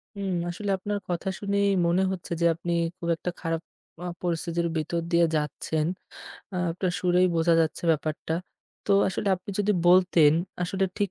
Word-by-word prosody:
হুম, 195 -2 -2 0.2
আসলে 200 +4 -4
আপনার 205 +2 -3
কথা 175 +2 -1
শুনেই 200 0 +1 0.2
মনে 175 +3 +3
হচ্ছে 180 -3 -6
যে, - - +3
আপনি 170 +1 -4 0.3
খুব 170 -2 -4
একটা 180 +2 -4
খারাপ, 165 -1 -1 0.4
আ - - -3
পরিস্থিতির 170 -1 -1
ভিতর 160 +2 -1
দিয়ে 170 0 +5
যাচ্ছেন। 150 +1 -1 0.7
আ - - -2 0.2
আপনার 180 +1 -1
সুরেই 180 0 +4
বোঝা 165 +1 +4
যাচ্ছে 160 0 -1
ব্যাপারটা। 155 0 -1 0.5
তো 200 - +3 0.2
আসলে 190 +1 -2
আপনি 180 +3 -9
যদি 205 0 +2 0.2
বলতেন 175 -4 +6 0.3
আসলে 190 +2 0
ঠিক 200 -3 0
175 Hz, 160 wpm, -26 LUFS, 165-190 Hz, 0.7 s, বলতেন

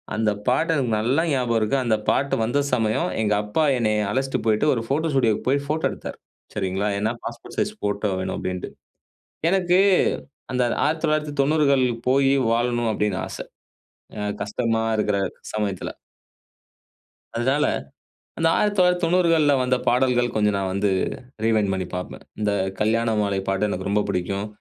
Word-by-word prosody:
அந்த 110 0 +1 0.2
பாட்டு 160 +7 +2
எனக்கு 130 -6 0
நல்லா 130 +8 +2
ஞாபகம் 125 -4 +1
இருக்கு. 110 +6 +1
அந்த 110 - +3
பாட்டு 140 0 +1
வந்த 120 +6 +1
சமயம் 110 -2 +1
எங்க 105 -1 +2
அப்பா 105 +10 0
என்னைய 110 -2 +1
அழச்சிட்டு 135 +3 -1
போயிட்டு 110 +4 +2
ஒரு 115 - -1
போட்டோ 155 +3 0
ஸ்டுடியோவுக்கு 115 -5 +1
போய் 140 +1 +1
போட்டோ 155 +1 0
எடுத்தார். - - -8 0.4
சரிங்களா, 95 +1 -1
ஏன்னா 110 +3 0
பாஸ்போர்ட் 120 0 -8
சைஸ் 210 0 0
போட்டோ 100 0 -1
வேணும் 95 0 -3
அப்படின்ட்டு. 90 0 -4 0.8
எனக்கு 185 -1 +3 0.7
அந்த 125 - +1 0.2
1990கள் 150 -3 +2 0.2
போயி 135 +1 +4 0.2
வாழணும்னு 120 -1 +1
அப்படின்னு 105 -2 0
ஆச. - - -7 0.8
அ - - -3 0.2
கஷ்டமா 115 +1 -1
இருக்கிற 105 -1 +1 0.4
சமயத்தில. 100 -4 -2 1.5
அதனால, 135 +5 +2 0.7
அந்த 165 - +2
1990கள்ல 180 -5 +3
வந்த 130 0 +2
பாடல்கள் 125 -1 +2
கொஞ்சம் 105 -1 +2
நான் 95 -1 -2
வந்து 100 +1 +1 0.5
ரீவைண்ட் 110 -3 +2
பண்ணி 95 -1 -2
பாப்பேன். 90 - -6 0.2
இந்த 105 -1 +1 0.3
கல்யாண 115 +1 +1
மாலை 100 -1 0
பாட்டு 95 +2 +1
எனக்கு 95 -1 -3
ரொம்ப 105 +1 +2
புடிக்கும். 100 +3 -2
115 Hz, 140 wpm, -23 LUFS, 105-140 Hz, 1.5 s, போயி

